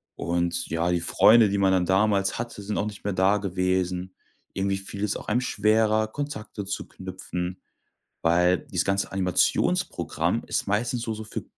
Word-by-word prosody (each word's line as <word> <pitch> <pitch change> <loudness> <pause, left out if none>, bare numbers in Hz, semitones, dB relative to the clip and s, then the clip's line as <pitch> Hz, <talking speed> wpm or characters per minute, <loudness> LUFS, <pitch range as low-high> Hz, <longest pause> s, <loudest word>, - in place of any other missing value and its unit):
und, 85 0 -1
ja, 85 +2 0
die 90 - +1
Freunde, 110 +5 +6
die 100 - 0
man 95 -1 +3
dann 90 -1 +2
damals 95 0 +2
hatte, 115 -2 -5
sind 105 +1 -3
auch - - 0
nicht 105 -1 -7
mehr 100 - -1
da 95 +2 +3
gewesen. 95 -1 -1 0.4
Irgendwie 95 0 -1
fiel 100 +1 -6
es 105 0 0
auch - - -11
einem 120 +4 +1
schwerer, 110 -1 +2
Kontakte 110 -5 -5
zu 100 - -4
knüpfen, 95 -1 -6 0.6
weil 90 +2 +3
dieses 90 -2 -2
ganze 95 0 0
Animationsprogramm 90 -2 0
ist - - -2
meistens 115 +4 -1
nur 110 - -2
so 110 - -7
für 110 - -6
95 Hz, 170 wpm, -25 LUFS, 90-105 Hz, 0.6 s, Freunde